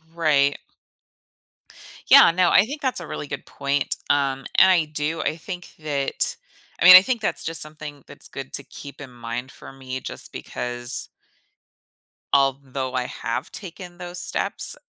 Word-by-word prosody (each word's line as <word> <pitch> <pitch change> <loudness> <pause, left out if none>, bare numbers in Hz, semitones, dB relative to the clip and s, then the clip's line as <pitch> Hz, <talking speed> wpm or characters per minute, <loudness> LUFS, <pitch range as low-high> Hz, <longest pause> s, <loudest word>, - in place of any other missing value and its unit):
Right. 145 -4 +2 1.5
Yeah, - - +9
no, 180 0 +3
I 200 - +5
think 285 +4 -7
that's 260 -8 0
a 170 - -8
really 145 - -6
good 140 - -6
point, 140 0 -2
um, 140 -2 +1 0.2
and 190 - +7
I 175 -4 +4
do. 150 +1 -3
I 155 - -2
think 180 +1 -8
that 145 -3 -1 0.5
I - - +3
mean, 185 0 +12
I 185 - +8
think 235 +1 -2
that's - - -1
just 165 0 0
something 150 -2 -7
that's - - -7
good 135 -1 -8
to 140 - -1
keep 140 +1 -11
in 140 -3 -9
mind 120 +2 -6
for - - -12
me 130 -1 -7
just - - -8
because 120 +1 -2 1.3
although 135 -1 0
I 125 - 0
have 125 +1 -5
taken 180 -2 -9
those 175 0 -7
steps - - -1
145 Hz, 160 wpm, -23 LUFS, 135-175 Hz, 1.5 s, mean